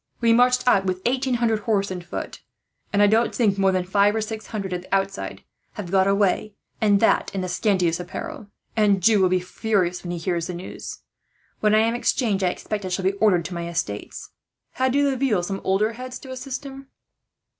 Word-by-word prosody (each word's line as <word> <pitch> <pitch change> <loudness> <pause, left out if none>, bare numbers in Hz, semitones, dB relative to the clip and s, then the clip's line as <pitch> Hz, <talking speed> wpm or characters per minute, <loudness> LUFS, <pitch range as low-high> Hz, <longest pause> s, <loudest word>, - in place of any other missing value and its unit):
We 230 -1 +4
marched 250 +1 +3
out 195 -6 +4
with 185 0 -2
eighteen 255 +1 +1
hundred 230 -2 +1
men, 210 - -13
horse 200 -3 +1
and 180 -1 -5
foot; 175 - -6 0.5
and 205 0 +3
I - - +8
don't 220 +3 +2
think 205 -5 +2
more 195 0 +4
than 185 -1 0
five 200 +3 +2
or 220 - 0
six 220 0 -5
hundred, 195 -4 -4
at 180 - -3
the 185 - -2
outside, 195 0 -3 0.3
have 185 -5 -7
got 190 0 +4
away 200 +1 +1 0.3
and 205 -2 +4
that 225 - +3
in 190 - -1
the 185 - -3
scantiest 180 -2 +1
apparel. 220 - -7 0.3
"Anjou 205 -1 +4
will 185 - +4
be 185 0 +2
furious, 180 -1 -1
when 175 - -6
he 175 - -3
hears 170 0 -2
the 180 - -5
news. 175 - -8 0.6
When 215 0 +3
I 215 - +5
am 225 +1 +2
exchanged, 225 -4 0
I - - +3
expect 205 +3 -4
I - - -3
shall 185 +1 -2
be 190 - +4
ordered 180 -6 +4
to 185 - -5
my 170 0 -4
estates. 105 -12 -5 0.4
Had 260 0 0
De 285 +1 +3
Laville 265 -8 +1
some 195 +2 -4
older 200 +4 +1
heads 255 +2 -7
to 260 - -11
assist 260 +1 -6
him?" 270 0 -9
200 Hz, 215 wpm, -23 LUFS, 185-230 Hz, 0.6 s, I